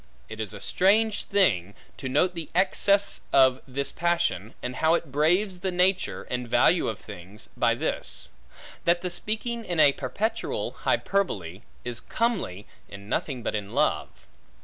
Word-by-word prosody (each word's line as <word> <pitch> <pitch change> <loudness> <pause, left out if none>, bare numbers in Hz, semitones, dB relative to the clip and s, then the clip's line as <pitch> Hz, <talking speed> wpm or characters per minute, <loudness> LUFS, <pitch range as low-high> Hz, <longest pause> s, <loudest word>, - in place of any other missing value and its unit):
It 110 0 -8
is 110 -2 -3
a 105 - -7
strange 210 - +2
thing, 100 - +2 0.2
to 130 - -5
note 165 +7 +2
the 165 -3 -6
excess 200 +2 +2
of 130 -1 +5
this 140 +1 -2
passion, 170 - 0
and 125 +1 -4
how 160 +1 +4
it 165 -4 -3
braves 180 +7 +2
the 190 - -1
nature, 185 +1 +1
and 125 -1 -4
value 160 +9 +4
of 110 - -2
things, 100 0 -11
by - - +2
this; - - -3 0.6
that 175 +1 +3
the 180 - -2
speaking 225 +5 -3
in 175 -6 -2
a 145 - +7
perpetual 175 - -2
hyperbole, 100 - -1 0.2
is 120 -1 -3
comely 195 - -1 0.2
in 100 +1 -11
nothing 130 -1 -2
but - - -2
in 105 +2 -4
love. 150 +2 +1
150 Hz, 155 wpm, -26 LUFS, 110-185 Hz, 0.6 s, a